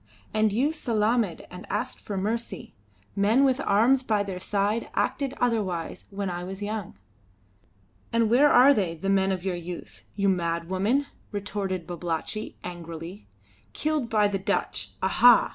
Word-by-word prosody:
"And 215 0 +3
you 260 +9 +2
salaamed 225 - 0
and 180 +1 -9
asked 210 +6 -2
for 200 - -5
mercy. 230 +3 -3 0.4
Men 215 +7 +4
with 265 -1 +3
arms 235 +6 +4
by 215 -5 +1
their 190 -2 -5
side 205 +4 -1
acted 275 -1 0
otherwise 205 -9 -1
when 200 0 -3
I 175 -1 -3
was 190 +2 -6
young." 210 -2 -4 1.1
"And 230 -1 +3
where 260 +7 +5
are 265 +3 +7
they, 185 -9 0
the 195 +4 -3
men 195 0 +3
of 185 -2 -2
your 190 -1 -1
youth? 175 0 -8
You 200 0 +1
mad 170 -3 0
woman!" 205 +10 +1 0.3
retorted 195 -3 -3
Babalatchi, 175 +4 -4
angrily. 170 +2 -8 0.5
"Killed 300 -6 -1
by 210 -2 +3
the 200 -1 -2
Dutch. 190 - -2
Aha! 245 -1 +6
205 Hz, 150 wpm, -26 LUFS, 185-230 Hz, 1.1 s, are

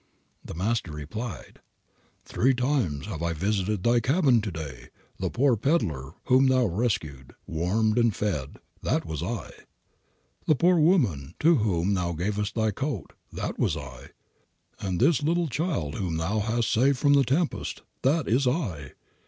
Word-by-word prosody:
The - - -8
Master 100 -1 -1
replied, 80 - -7 0.7
"Three 130 +2 +2
times 125 - 0
have 95 -7 -6
I 85 0 0
visited 95 +3 -1
thy 120 0 +4
cabin 130 -1 +3
to 105 - -3
day. 70 -7 -7 0.3
The - - -1
poor 135 -1 +3
peddler 90 - -1
whom 130 +1 +5
thou 130 -1 +3
rescued, 90 - -2
warmed 105 +8 +1
and 115 -1 +4
fed, 75 -10 -2 0.2
that - - 0
was 80 -3 -4
I; - - -4 1.0
the 155 - +5
poor 175 +4 +4
woman 115 - +2
to 165 +1 +5
whom 100 -4 +1
thou 90 -2 -1
gavest 105 +5 -2
thy 110 -1 +1
coat, 125 - -4 0.2
that - - -4
was - - +1
I; - - -9 0.7
and 95 -3 -2
this 140 +1 +3
little 170 +3 +1
child 135 - -2
whom 85 -5 -2
thou 95 +7 -1
hast 115 +2 0
saved 135 +4 +3
from 145 +2 +3
the 140 -1 +5
tempest, 145 +6 -1 0.2
that 145 +2 +2
is 125 +5 +2
I. 95 - -2
110 Hz, 155 wpm, -26 LUFS, 85-135 Hz, 1.0 s, whom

